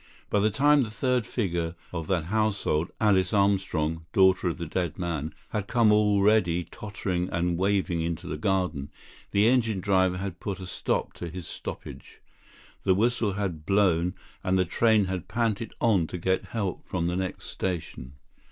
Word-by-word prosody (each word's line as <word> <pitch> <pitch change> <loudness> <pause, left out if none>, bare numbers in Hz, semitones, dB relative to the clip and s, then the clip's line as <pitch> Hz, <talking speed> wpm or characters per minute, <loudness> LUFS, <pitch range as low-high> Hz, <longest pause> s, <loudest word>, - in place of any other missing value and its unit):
By 105 - +3
the 105 +2 +3
time 145 +6 +4
the 115 - -1
third 125 +1 0
figure 85 -7 -2 0.2
of 80 -3 -4
that 90 -4 +1
household, 100 -4 0
Alice 95 -4 +3
Armstrong, 90 -5 +1
daughter 95 -1 +4
of 85 - -4
the 85 - -4
dead 85 0 -2
man, 80 -4 -3 0.2
had 105 -2 -3
come 115 -3 +4
already 105 -4 +3
tottering 95 -2 -4
and 85 0 0
waving 95 -2 +1
into 85 -1 -3
the 75 - -3
garden, 85 -4 -1 0.4
the 100 +2 +3
engine 115 -5 +2
driver 95 -1 +2
had 95 -2 -5
put 100 -2 -4
a 95 - -6
stop 90 - -2
to 85 - -6
his 90 0 -7
stoppage. - - -8 0.6
The 95 - +3
whistle 115 0 +1
had 95 -6 -3
blown 90 -2 +2 0.3
and 95 +1 +2
the 90 - +3
train 110 +3 +3
had 95 -2 -4
panted 115 -1 -1
on 100 -8 +3
to 90 - -5
get 95 +2 0
help 100 -5 -3
from 85 -2 -1
the 90 +1 0
next 95 0 -3
station. 80 -8 -4
95 Hz, 170 wpm, -27 LUFS, 85-105 Hz, 0.6 s, time